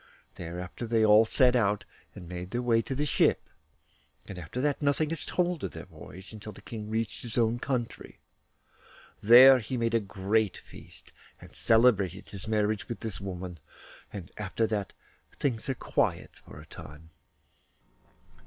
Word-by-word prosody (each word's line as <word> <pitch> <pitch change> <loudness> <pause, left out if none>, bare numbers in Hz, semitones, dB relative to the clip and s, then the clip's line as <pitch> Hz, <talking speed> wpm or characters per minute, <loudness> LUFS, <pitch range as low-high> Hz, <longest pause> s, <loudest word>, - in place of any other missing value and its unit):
Thereafter 90 +6 -6
they 110 -1 +3
all 105 +1 +7
set 125 +2 +3
out, 105 -4 +1 0.3
and 90 - -10
made 90 +1 -6
their 120 +4 -2
way 115 -2 +3
to 135 - -5
the 145 +3 0
ship; - - +2 0.8
and 95 - -7
after 85 +9 -6
that 145 +2 0
nothing 145 +2 +1
is 165 - -2
told 175 -2 -1
of - - -4
their - - -8
voyage 95 +6 -12
until 110 0 -8
the 100 - -14
King 110 -2 -7
reached 110 0 -2
his 120 -1 -7
own 115 0 +2
country. 125 -3 -4 1.0
There 125 +4 +9
he 125 +3 -4
made 115 -1 0
a 115 - +4
great 100 +1 -1
feast, - - -13 0.3
and - - -14
celebrated 105 -5 +2
his 100 +1 -9
marriage 105 0 0
with 120 - -5
this 110 -4 -4
woman; 90 -3 -6 0.5
and 95 -4 -8
after 105 +2 -1
that 105 -4 -2 0.5
things 130 0 -2
are 135 - 0
quiet - - -1
for - - -14
a - - -12
time. 75 +3 -12
110 Hz, 165 wpm, -28 LUFS, 95-120 Hz, 1.0 s, There